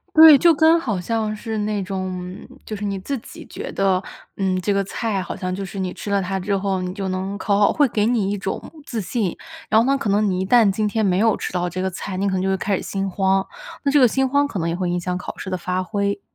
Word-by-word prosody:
对， 315 -2 +10
就 335 +5 +5
跟 320 +2 +5
好 215 - -2
像 215 +2 -1
是 220 0 -4
那 210 -1 -1
种 185 -1 -4 0.2
嗯， - - -13 0.2
就 215 - -5
是 205 0 -5
你 200 -1 -2
自 275 +9 -3
己 - - -12
觉 - - -6
得， 190 -1 +1 0.3
嗯， 185 -2 0
这 200 +2 0
个 200 - +2
菜 200 -1 -2
好 - - -6
像 185 0 -3
就 195 +1 -4
是 195 +1 -7
你 185 -1 -2
吃 205 - -7
了 200 -1 +2
它 190 +1 -2
之 200 +2 0
后 190 -1 -1
你 180 0 -3
就 195 -1 -4
能 190 +2 -3
考 200 -2 +1
好， 205 - +5
会 290 - +4
给 210 -1 0
你 225 -5 +1
一 - - -1
种 195 -1 -3 0.2
自 235 -5 -4
信， 205 -1 -2 0.3
然 220 - +5
后 235 - +2
呢， 275 +1 +3
可 220 -7 -2
能 205 +1 +2
你 185 0 0
一 - - 0
旦 230 -1 +5
今 210 +1 0
天 220 -1 0
没 180 0 +2
有 225 0 +3
吃 - - -5
到 180 -1 -1
这 185 +2 -4
个 190 - 0
菜， 185 +1 -5
你 200 +2 0
可 195 - 0
能 185 - 0
就 190 - 0
会 190 - +2
开 195 +1 0
始 - - -4
心 195 0 -3
慌， 190 0 +1 0.4
那 280 - +2
这 290 - +5
个 250 - +7
心 265 +3 +1
慌 285 +2 +2
可 205 - -4
能 165 -1 -1
也 165 - -1
会 180 0 -1
影 175 - 0
响 180 +1 -2
考 185 - -6
试 190 - -6
的 185 - -1
发 180 +1 -2
挥。 200 +1 -2
200 Hz, 310 characters per minute, -21 LUFS, 185-220 Hz, 0.4 s, 对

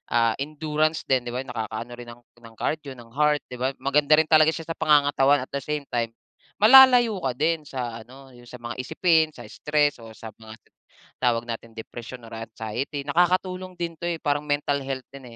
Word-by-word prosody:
ah, 115 -1 +3
endurance 155 +1 -1
din 130 -2 +2
di - - -3
ba 125 - -2
nakakaano 115 -1 -5
rin 120 -1 -10
ng 120 +1 -15 0.2
ng 115 -1 -14
cardio, 150 -3 -3
ng 115 -1 -14
heart, 150 +1 +2
di 125 - -6
ba 130 +1 +1
maganda 145 +2 +3
rin 160 - +2
talaga 155 -1 +6
siya 165 - -6
sa 165 - -4
pangangatawan 145 -2 +3
at - - -40
the 140 - -2
same 150 -2 -3
time 115 -1 0 0.5
malalayo 245 -1 +8
ka 130 - +1
din 160 +2 +1
sa 120 -4 -5
ano 135 +2 -15
yung 120 0 -16
sa 125 - -9
mga 120 0 -6
isipin, 160 +3 +2
sa - - -10
stress, 150 -4 0
o 115 -1 -11
sa 110 - -8
mga 110 -1 -12 0.7
tawag 120 -1 +2
nating 115 0 -6
depression, 120 +2 -8
or 115 - -12
anxiety. 115 +5 -5
Nakakatulong 185 +3 0
din 170 -1 -3
to, - - -13
eh, 170 -1 -3
parang 145 0 0
mental 145 -1 0
health 135 -2 -5
din, 135 -1 -11
140 Hz, 200 wpm, -24 LUFS, 120-155 Hz, 0.7 s, malalayo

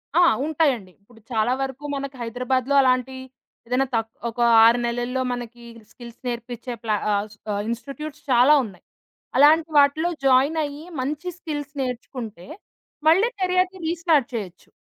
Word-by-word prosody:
ఆ! 350 - +6 0.2
ఉంటాయండి. 275 - 0
ఇప్పుడు 225 +3 -21
చాలా 225 +2 +1
వరకు 270 +1 -4
మనకు 275 0 -5
హైదరాబాద్లో 250 +3 -1
అలాంటి 255 0 +1 0.5
ఏదైనా 255 +3 +1
త - - +3 0.3
ఒక 230 - -11 0.3
6 235 +2 +5
నెలల్లో 245 +2 -2
మనకి 240 -1 -8 0.3
స్కిల్స్ 235 -2 -12
నేర్పిచే 240 +1 -5
ప్లా 215 -2 +1 0.2
ఆహ్, 205 +1 0 0.3
ఆహ్, 200 - -1
ఇన్‌స్టిట్యూట్స్ 280 +5 -6
చాలా 250 +4 +6
ఉన్నాయి. 195 -4 -13 0.5
అలాంటి 310 +4 +5
వాటిలో 285 +4 +3 0.2
జాయిన్ 270 +4 +4
అయ్యి 290 +1 -6 0.2
మంచి 295 +6 -4
స్కిల్స్ 290 -4 -5
నేర్చుకుంటే 240 -6 -6 0.6
మళ్ళీ 370 +8 +5
కెరియర్‌ని 370 0 +1
రీస్టార్ట్ 330 -6 +2
చేయొచ్చు. 190 -6 -7
255 Hz, 135 wpm, -23 LUFS, 235-295 Hz, 0.6 s, ఆ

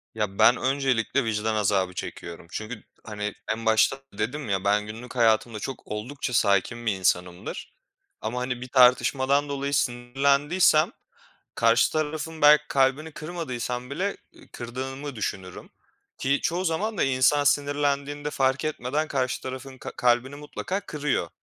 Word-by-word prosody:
Ya 105 -2 -3
ben 115 +3 +6
öncelikle 135 -1 +1
vicdan 110 0 -1
azabı 95 -3 +1
çekiyorum. 85 -1 -7
Çünkü, 110 +1 -6 0.2
hani, 105 -1 -4 0.2
en 115 +1 -4
başta 110 +4 +4
da 135 -6 -22
dedim 125 +3 -3
ya, 95 -1 0
ben 105 +1 +2
günlük 115 +4 -9
hayatımda 110 -1 +2
çok 135 +5 -5
oldukça 125 +4 -4
sakin 110 +3 +2
bir 110 - +2
insanımdır. 90 -1 -2 0.5
Ama, 115 +3 -3
hani, 125 -1 -3
bir 130 - -6
tartışmadan 130 +3 +4
dolayı 140 0 -2
sinirlendiysem 140 - +2 0.6
karşı - - +3
tarafın 155 0 -3
belki 150 +1 +7
kalbini 140 +4 +1
kırmadıysam 125 -7 -5
bile 190 +8 -2 0.4
kırdığımı 130 +3 -6
düşünürüm. 95 -3 -5 0.5
Ki 140 +2 +1
çoğu 180 +3 0
zaman 205 +6 -1
da - - +3
insan 135 +2 +3
sinirlendiğinde 145 +1 0
fark 135 0 +1
etmeden 155 +1 -2
karşı 130 -2 -1
tarafın 130 0 -7
ka - - -7
kalbini 125 +3 +2
mutlaka 165 +6 -4
kırıyor. 145 - -2
130 Hz, 135 wpm, -26 LUFS, 110-145 Hz, 0.6 s, belki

